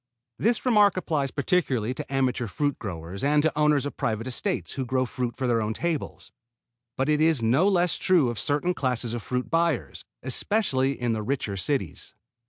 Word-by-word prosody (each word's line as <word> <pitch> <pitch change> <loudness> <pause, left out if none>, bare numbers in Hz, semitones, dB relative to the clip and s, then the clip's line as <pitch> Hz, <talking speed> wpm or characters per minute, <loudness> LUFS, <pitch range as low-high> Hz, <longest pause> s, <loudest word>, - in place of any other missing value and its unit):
This 230 +3 +1
remark 210 -6 +4
applies 150 -6 -1
particularly 135 - 0
to 130 - -7
amateur 130 -3 0
fruit 145 +8 -1
growers 90 0 -6
and 145 +1 +3
to 160 -2 +1
owners 150 -2 +3
of 145 - -5
private 110 0 -1
estates 175 +9 -3
who 135 - -3
grow 130 +1 0
fruit 125 -1 -3
for 130 - -2
their 120 -2 +2
own 110 0 -2
tables, 170 -4 -3 0.7
but 135 - 0
it 150 0 +2
is 155 -6 +3
no 130 - +3
less 180 -3 +2
true 175 -9 +3
of 120 - -7
a - - 0
certain 150 - 0
class 130 -7 -1
of 120 -1 -3
fruit 125 +3 -3
buyers, 165 -5 0 0.2
especially 135 - +1
in 120 -1 0
the 110 - -2
richer 110 -3 -2
cities. 95 - -3
135 Hz, 190 wpm, -26 LUFS, 120-160 Hz, 0.7 s, remark